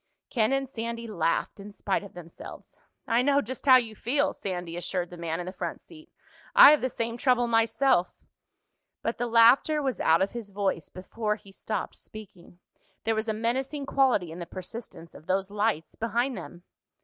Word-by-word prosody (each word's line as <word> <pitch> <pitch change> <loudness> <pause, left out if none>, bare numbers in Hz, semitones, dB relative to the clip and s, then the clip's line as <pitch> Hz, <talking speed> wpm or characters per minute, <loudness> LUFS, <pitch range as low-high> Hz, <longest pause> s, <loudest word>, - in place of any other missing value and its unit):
Ken 225 -1 +2
and 270 0 0
Sandy 235 -2 -5
laughed 170 -3 -1
in 200 +1 -9
spite 200 -1 -1
of 200 -2 -12
themselves. 170 -2 -11 0.3
"I 230 +2 +2
know 280 +2 +3
just 260 +2 -6
how 260 - +9
you 225 -3 -3
feel," 285 +7 0
Sandy 175 -3 -5
assured 175 0 -3
the - - -8
man 165 -1 -3
in 175 - -4
the 185 - -5
front 175 -3 -5
seat. 325 -1 -16 0.4
"I - - +11
have 300 - +3
the 255 - 0
same 230 -1 -3
trouble 245 -1 +2
myself." 225 -3 +2 0.9
But 230 - -2
the 245 - 0
laughter 235 +6 +5
was 270 -3 -2
out 165 +3 +4
of 195 - -2
his 235 -4 -7
voice 195 -4 -2
before 210 +3 -3
he 200 -2 -16
stopped 205 0 -4
speaking. 190 -5 -13 0.5
There 225 - +1
was 220 +1 -2
a 220 - 0
menacing 260 +6 -2
quality 255 -12 +2
in 165 - -8
the 170 - -6
persistence 185 -3 -9
of 155 - -15
those 195 +1 0
lights 205 -6 -1
behind 240 +3 -1
them. 175 -2 -9
220 Hz, 185 wpm, -27 LUFS, 185-245 Hz, 0.9 s, I